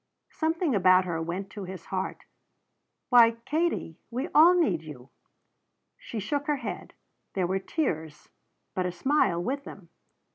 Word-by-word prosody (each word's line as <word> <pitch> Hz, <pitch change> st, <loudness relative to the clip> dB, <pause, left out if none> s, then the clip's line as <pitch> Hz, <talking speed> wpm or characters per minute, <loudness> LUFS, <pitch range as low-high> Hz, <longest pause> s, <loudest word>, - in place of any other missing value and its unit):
Something 320 Hz, -1 st, 0 dB
about 185 Hz, -2 st, +5 dB
her 165 Hz, -2 st, -2 dB
went 180 Hz, +4 st, -4 dB
to 205 Hz, -, -7 dB
his 185 Hz, -2 st, -8 dB
heart. 190 Hz, 0 st, -4 dB, 0.8 s
"Why, 230 Hz, -2 st, +6 dB
Katie 315 Hz, -, -1 dB
we 245 Hz, +3 st, -3 dB
all 330 Hz, +4 st, +7 dB
need 280 Hz, -, +2 dB
you." 140 Hz, -5 st, -11 dB, 0.8 s
She 225 Hz, -, -7 dB
shook 285 Hz, +9 st, -2 dB
her 300 Hz, -, +2 dB
head; -, -, -6 dB, 0.4 s
there 185 Hz, -2 st, +1 dB
were 190 Hz, +2 st, 0 dB
tears, 160 Hz, -, -3 dB, 0.5 s
but 185 Hz, -1 st, -1 dB
a -, -, -2 dB
smile 175 Hz, -, +1 dB
with 275 Hz, +6 st, -2 dB
them. 185 Hz, -10 st, -11 dB
195 Hz, 145 wpm, -27 LUFS, 175-285 Hz, 0.8 s, all